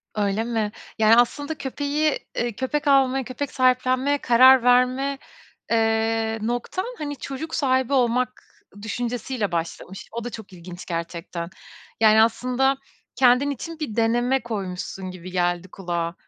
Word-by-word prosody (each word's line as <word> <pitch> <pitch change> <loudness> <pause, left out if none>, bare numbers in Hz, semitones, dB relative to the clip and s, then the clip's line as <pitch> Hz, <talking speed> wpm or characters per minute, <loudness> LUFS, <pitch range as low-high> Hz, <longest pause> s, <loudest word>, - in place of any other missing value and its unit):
Öyle 205 +1 0
mi? 225 -3 -1 0.3
Yani 220 +1 +6
aslında 285 +6 +1
köpeği, 290 +3 -1 0.2
eee, 240 0 -1
köpek 290 +5 -2
almaya, 270 -1 +4
köpek 260 +4 -5
sahiplenmeye 255 +2 +2
karar 260 0 +6
verme, 255 +3 +3 0.5
eee, 225 0 +1
noktan 245 - -2
hani 290 -1 -4
çocuk 275 +5 -6
sahibi 260 -1 +1
olmak 250 0 +1 0.4
düşüncesi 240 +3 -3
ile 205 -7 -1
başlamış. 170 +3 -5
O 235 0 -5
da 245 - -4
çok 215 -3 -10
ilginç 175 0 -10
gerçekten. 170 0 -5 0.5
Yani 220 0 +6
aslında 255 +4 +1 0.4
kendin 255 +2 +4
için 320 +4 -6
bir 265 -8 -4
deneme 240 +3 +2
koymuşsun 190 -4 -5
gibi 185 0 -9
geldi 175 0 0
kulağa. 170 -3 -3
240 Hz, 135 wpm, -23 LUFS, 210-265 Hz, 0.5 s, Yani